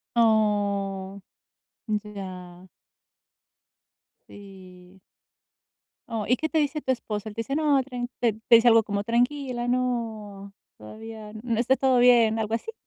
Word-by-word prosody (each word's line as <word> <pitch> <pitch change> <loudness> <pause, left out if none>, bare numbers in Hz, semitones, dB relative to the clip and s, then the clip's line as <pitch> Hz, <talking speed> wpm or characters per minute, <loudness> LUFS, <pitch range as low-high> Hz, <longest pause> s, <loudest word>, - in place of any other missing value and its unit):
¡Oh! 200 -3 +1 0.7
Ya. 190 -4 -6 1.6
Sí 185 -2 -15 1.1
Oh, 225 -2 -3
¿y 250 - +3
qué 315 +3 -2
te 320 - 0
dice 300 0 0
tu 260 - -2
esposo? 215 -3 -5
Él 205 - -9
te 230 - -4
dice: 275 +5 -4
"No, 295 -3 +2
tran 245 -2 -5
¿Te 235 -3 +2
te 225 +2 +2
dice 235 +1 +5
algo? 225 -1 +6
Como, 205 -1 -3
tranquila, 245 +1 -1
no, 220 -5 -3 0.2
todavía, 215 - -10
no 230 -2 -1
está 255 +2 +2
todo 260 -2 +2
bien, 235 -2 +5
¿algo 220 0 -2
así? 340 - -4
225 Hz, 135 wpm, -25 LUFS, 200-245 Hz, 1.6 s, algo